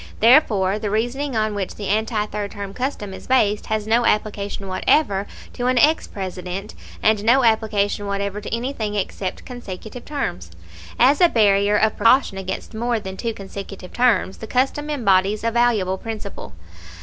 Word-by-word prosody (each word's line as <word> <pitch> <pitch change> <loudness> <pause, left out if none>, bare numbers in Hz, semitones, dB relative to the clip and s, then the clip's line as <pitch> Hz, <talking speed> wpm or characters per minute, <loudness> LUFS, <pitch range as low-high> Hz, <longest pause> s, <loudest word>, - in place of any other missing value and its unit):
Therefore 215 -6 +4
the 210 -1 -3
reasoning 245 +6 -1
on 215 -1 0
which 200 -2 -4
the 205 - -5
anti 215 +1 0
third 210 -1 -4
term 200 -1 -7
custom 245 -5 -4
is - - -10
based 215 -5 +2
has 215 -1 -1
no 230 +2 +3
application 205 -2 -1
whatever 195 +1 +1 0.3
to 245 0 -2
an 255 0 +2
ex 305 +6 +4
President, 190 +1 -6 0.3
and 215 -1 +3
no 250 +4 +4
application 210 -2 +1
whatever 200 +1 -2
to - - -7
anything 230 -3 -3
except 190 -1 -3
consecutive 240 -1 -8
terms. 180 - -4 0.5
As 275 +7 +4
a 350 - +7
barrier 205 -3 +3
of 220 0 +1
precaution 230 -4 +3
against 190 +3 -5
more 235 +1 -1
than 190 -2 -7
two 230 +2 -3
consecutive 195 -1 -9
terms 230 -6 +2
the 220 - -7
custom 270 +5 0
embodies 205 -6 +2
a 230 - +1
valuable 220 -6 +1
principle. 215 - -7
215 Hz, 160 wpm, -21 LUFS, 200-240 Hz, 0.5 s, a